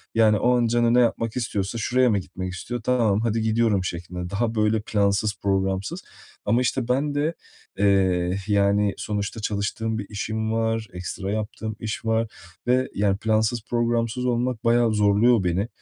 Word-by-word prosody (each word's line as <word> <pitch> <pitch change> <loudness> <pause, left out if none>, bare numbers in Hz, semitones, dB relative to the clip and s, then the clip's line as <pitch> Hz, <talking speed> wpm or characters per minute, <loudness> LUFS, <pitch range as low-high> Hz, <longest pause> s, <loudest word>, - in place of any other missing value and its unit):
Yani, 110 -2 +5
o 125 0 +3
an 120 -1 +2
canı 120 0 +2
ne 125 - +5
yapmak 115 -1 +1
istiyorsa 105 -3 -2
şuraya 125 +3 +2
mı 105 - +2
gitmek 95 0 -6
istiyor, 120 +6 -5
"Tamam, 115 -4 +2
hadi 115 -1 0
gidiyorum." 110 -3 +2
şeklinde. 90 0 -5
Daha 115 +3 -1
böyle 105 0 +2
plansız, 100 0 +1
programsız. 95 - -1 0.4
Ama, 115 +4 +2
işte, 125 0 -1
ben 140 +3 0
de, 155 +3 0 0.5
eee, 95 -2 +2
yani, 100 0 +2
sonuçta 105 +1 -3
çalıştığım 110 +2 -2
bir 105 - -4
işim 110 +1 -3
var, 115 -1 0
ekstra 95 +2 -5
yaptığım 110 0 -4
iş 110 +1 -5
var 115 0 +1 0.4
ve, 130 +1 +3
yani, 100 -1 +1
plansız, 110 +1 +1
programsız 120 +1 0
olmak 125 -1 -1
bayağı 115 -1 +3
zorluyor 105 +2 +4
beni. 90 +5 0
110 Hz, 160 wpm, -24 LUFS, 100-120 Hz, 0.5 s, Yani